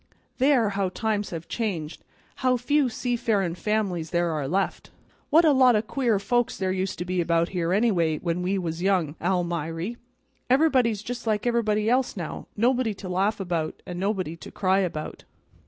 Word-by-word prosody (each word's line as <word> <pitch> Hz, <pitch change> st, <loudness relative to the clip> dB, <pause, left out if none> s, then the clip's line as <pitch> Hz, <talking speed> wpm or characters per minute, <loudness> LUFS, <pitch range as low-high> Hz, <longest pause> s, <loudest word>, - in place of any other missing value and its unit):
There, 260 Hz, -5 st, +4 dB
how 195 Hz, -1 st, -1 dB
times 210 Hz, +1 st, -2 dB
have 165 Hz, -1 st, -6 dB
changed; 175 Hz, -9 st, -3 dB, 0.3 s
how 255 Hz, -1 st, +2 dB
few 280 Hz, +2 st, +2 dB
seafarin' 225 Hz, -7 st, 0 dB
families 185 Hz, -4 st, -1 dB
there 175 Hz, -1 st, +1 dB
are 150 Hz, -3 st, -2 dB
left! 190 Hz, +6 st, -1 dB, 0.4 s
What 330 Hz, +3 st, +6 dB
a 310 Hz, -, +6 dB
lot 260 Hz, -3 st, +5 dB
o' 210 Hz, -, +2 dB
queer 235 Hz, -2 st, 0 dB
folks 240 Hz, +4 st, 0 dB
there 190 Hz, -1 st, -1 dB
used 190 Hz, 0 st, -2 dB
to 175 Hz, -, -4 dB
be 180 Hz, 0 st, 0 dB
about 170 Hz, 0 st, +1 dB
here, 175 Hz, -2 st, -1 dB
anyway, 185 Hz, -7 st, +2 dB
when 170 Hz, +2 st, -2 dB
we 190 Hz, +2 st, 0 dB
was 170 Hz, -2 st, -3 dB
young, 180 Hz, -6 st, +1 dB
Almiry. 175 Hz, +2 st, -1 dB, 0.5 s
Everybody's 255 Hz, -6 st, +3 dB
just 240 Hz, 0 st, -6 dB
like 215 Hz, 0 st, 0 dB
everybody 215 Hz, -3 st, +1 dB
else, 250 Hz, -1 st, +1 dB
now; 170 Hz, -4 st, -5 dB
nobody 240 Hz, -1 st, +2 dB
to 190 Hz, -, -8 dB
laugh 195 Hz, +4 st, 0 dB
about, 170 Hz, -4 st, -3 dB
and 180 Hz, -1 st, -6 dB
nobody 190 Hz, -4 st, -1 dB
to -, -, -10 dB
cry 190 Hz, 0 st, +1 dB
about." 165 Hz, -5 st, -3 dB
195 Hz, 170 wpm, -25 LUFS, 175-235 Hz, 0.5 s, What